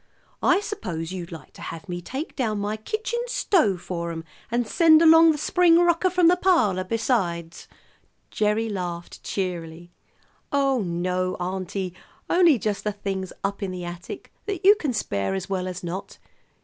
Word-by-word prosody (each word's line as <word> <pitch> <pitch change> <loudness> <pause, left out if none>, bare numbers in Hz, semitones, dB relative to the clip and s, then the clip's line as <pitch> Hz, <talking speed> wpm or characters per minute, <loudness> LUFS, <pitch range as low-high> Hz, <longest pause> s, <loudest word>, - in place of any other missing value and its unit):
I 385 - +4
suppose 180 - -5
you'd 180 -1 -6
like 165 - -10
to - - -13
have 165 +5 -7
me 175 -1 -4
take 265 - -6
down 220 -6 -1
my 205 +1 -2
kitchen 430 - -3
stove 310 - +2
for 170 -2 -4
'em, 165 -1 -6 0.3
and 240 0 0
send 320 +1 +6
along 325 0 +7
the 305 - -2
spring 335 +2 +4
rocker, 345 +1 +3
from 360 -1 +4
the 355 - +6
parlor, 325 - +2
besides." 185 -6 -1 0.6
Gerry 215 +1 +1
laughed 175 -4 -5
cheerily. 175 -3 -4 0.6
"Oh, 275 -3 +2
no, 180 0 -1
auntie, 185 0 -4 0.4
only 345 -6 +5
just 210 -1 -2
the 210 - 0
things 195 -2 -4
up 200 +1 -2
in 195 - -2
the 180 -1 -5
attic 175 +1 -8
that 390 -3 -3
you 405 - +10
can 305 -10 -2
spare 100 - -2
as 95 - -5
well 185 -1 -1
as 180 0 -6
not. 175 +3 -6
200 Hz, 165 wpm, -24 LUFS, -, 0.6 s, you